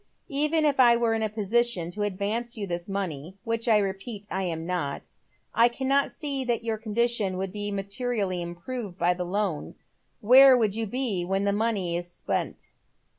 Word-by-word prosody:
•' -, -, -36 dB, 0.2 s
Even 300 Hz, +3 st, +2 dB
if 285 Hz, -2 st, +1 dB
I 240 Hz, -2 st, +7 dB
were 235 Hz, -1 st, +1 dB
in 225 Hz, -, -1 dB
a 220 Hz, -, 0 dB
position 215 Hz, -4 st, 0 dB
to 210 Hz, -, -5 dB
advance 210 Hz, +5 st, -2 dB
you 205 Hz, -, -3 dB
this 175 Hz, 0 st, -4 dB
money 185 Hz, -3 st, -4 dB
— -, -, -46 dB
which 230 Hz, +1 st, -2 dB
I 220 Hz, -2 st, +5 dB
repeat 200 Hz, +1 st, -3 dB
lam 170 Hz, -4 st, -2 dB
not 170 Hz, -6 st, -4 dB, 0.2 s
— -, -, -35 dB, 0.2 s
I 230 Hz, +1 st, +6 dB
cannot 270 Hz, +3 st, +1 dB
see 280 Hz, -3 st, -1 dB
that 240 Hz, -2 st, -1 dB
your 225 Hz, -2 st, -2 dB
condition 220 Hz, -3 st, 0 dB
would 190 Hz, 0 st, -3 dB
be 205 Hz, +1 st, -3 dB
materially 200 Hz, -1 st, -2 dB
improved 175 Hz, +4 st, -6 dB
by 175 Hz, 0 st, +2 dB
the 180 Hz, 0 st, -4 dB
loan. 185 Hz, -4 st, -2 dB, 0.4 s
Where 260 Hz, +3 st, +8 dB
would 215 Hz, -4 st, +1 dB
you 225 Hz, 0 st, -2 dB
be 225 Hz, -5 st, 0 dB
when 195 Hz, +2 st, -1 dB
the 200 Hz, 0 st, +1 dB
money 205 Hz, -5 st, 0 dB
was 175 Hz, 0 st, -6 dB
spent -, -, -4 dB
210 Hz, 190 wpm, -26 LUFS, 185-235 Hz, 0.4 s, Where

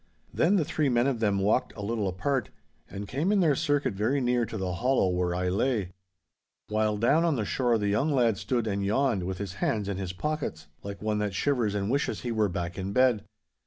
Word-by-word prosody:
'Then 180 Hz, +5 st, +3 dB
the 170 Hz, -6 st, +2 dB
three 155 Hz, -2 st, 0 dB
men 120 Hz, 0 st, +2 dB
of 135 Hz, -4 st, 0 dB
them 105 Hz, -3 st, +1 dB
walked 105 Hz, +6 st, +1 dB
a -, -, -5 dB
little 105 Hz, -1 st, -1 dB
apart, 105 Hz, +7 st, -1 dB, 0.4 s
and 100 Hz, +1 st, -6 dB
came 150 Hz, -, 0 dB
in 210 Hz, -, +3 dB
their 165 Hz, -5 st, +4 dB
circuit 145 Hz, -4 st, 0 dB
very 110 Hz, +8 st, 0 dB
near 125 Hz, -2 st, +1 dB
to 110 Hz, -, -5 dB
the 95 Hz, -2 st, -2 dB
hollow 125 Hz, +1 st, +2 dB
where 90 Hz, -1 st, 0 dB
I 90 Hz, 0 st, -1 dB
lay. 100 Hz, 0 st, 0 dB, 0.8 s
While 105 Hz, 0 st, +1 dB
down 140 Hz, +10 st, +3 dB
on 165 Hz, -3 st, +2 dB
the 110 Hz, -4 st, -1 dB
shore 120 Hz, +1 st, +1 dB
the 105 Hz, -1 st, -1 dB
young 135 Hz, +10 st, +1 dB
lad 120 Hz, -7 st, +2 dB
stood 115 Hz, +3 st, -1 dB
and 100 Hz, -2 st, -1 dB
yawned, 110 Hz, +1 st, +1 dB
with 95 Hz, +1 st, -3 dB
his 100 Hz, -2 st, -5 dB
hands 105 Hz, -3 st, 0 dB
in 100 Hz, -2 st, -2 dB
his 95 Hz, -2 st, -3 dB
pockets, 115 Hz, -, -3 dB, 0.2 s
like 100 Hz, +1 st, -7 dB
one 105 Hz, -1 st, 0 dB
that 105 Hz, -2 st, -2 dB
shivers 120 Hz, -5 st, +1 dB
and 100 Hz, +2 st, -1 dB
wishes 140 Hz, +2 st, -1 dB
he 120 Hz, -, -3 dB
were 110 Hz, -2 st, +1 dB
back 90 Hz, 0 st, -4 dB
in 95 Hz, +1 st, -3 dB
bed. 125 Hz, -4 st, +3 dB
110 Hz, 225 wpm, -28 LUFS, 100-130 Hz, 0.8 s, their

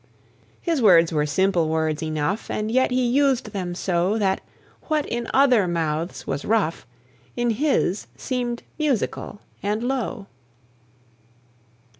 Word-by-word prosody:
His 330 Hz, -6 st, 0 dB
words 170 Hz, -6 st, +6 dB
were 150 Hz, -1 st, +1 dB
simple 175 Hz, 0 st, +2 dB
words 160 Hz, -1 st, 0 dB
enough, 155 Hz, +6 st, -2 dB
And 215 Hz, +1 st, -2 dB
yet 260 Hz, +2 st, +3 dB
he 250 Hz, 0 st, +1 dB
used 265 Hz, +1 st, +2 dB
them 180 Hz, -3 st, -3 dB
so, 180 Hz, +3 st, 0 dB
That 195 Hz, -3 st, +1 dB, 0.4 s
what 305 Hz, -2 st, 0 dB
in 235 Hz, 0 st, -3 dB
other 255 Hz, -8 st, +4 dB
mouths 165 Hz, 0 st, -2 dB
was 140 Hz, +1 st, -3 dB
rough 205 Hz, -7 st, 0 dB, 0.5 s
In 240 Hz, -1 st, +1 dB
his 225 Hz, -6 st, 0 dB
seemed 245 Hz, -2 st, -3 dB, 0.2 s
musical 265 Hz, -7 st, -1 dB, 0.2 s
and 210 Hz, +3 st, -1 dB
low. 245 Hz, -4 st, -2 dB
210 Hz, 125 wpm, -23 LUFS, 170-250 Hz, 0.5 s, words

